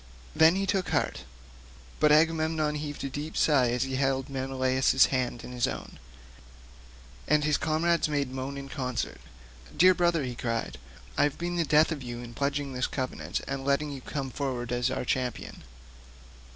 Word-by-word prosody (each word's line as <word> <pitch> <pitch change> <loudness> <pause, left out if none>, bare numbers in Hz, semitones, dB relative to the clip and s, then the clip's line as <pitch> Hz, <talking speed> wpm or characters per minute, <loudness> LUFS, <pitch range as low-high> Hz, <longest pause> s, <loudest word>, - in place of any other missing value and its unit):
Then 160 +2 +6
he 195 +1 0
took 195 -2 0
heart, 65 - -1 0.7
but 150 - +5
Agamemnon 155 0 +3
heaved 150 -1 -5
a - - -1
deep 145 +4 -5
sigh 135 -6 +4
as 125 +1 0
he 135 -1 -3
held 135 0 0
Menelaus's 130 0 +2
hand 125 -2 -1
in - - -8
his 125 -1 0
own, - - -7 1.3
and 150 0 +3
his 150 -1 +2
comrades 160 +2 +1
made 140 -3 -1
moan 130 +1 -4
in 140 0 -7
concert. 125 - -4 0.6
"Dear 185 +2 +7
brother," 175 -3 +2
he 125 -1 -3
cried, 115 - -3 0.4
"I - - +6
have 145 - -2
been 175 +1 -3
the 170 -1 +1
death 155 +3 +4
of 150 -3 -3
you 120 -1 -6
in 120 -1 -9
pledging 140 +1 -2
this 125 0 0
covenant 130 -2 -3
and 135 0 -3
letting 140 +2 +1
you 135 -2 -7
come 135 0 -4
forward 125 -4 -3
as 120 0 +1
our - - -3
champion. 125 -1 -3
140 Hz, 175 wpm, -28 LUFS, 130-155 Hz, 1.3 s, Dear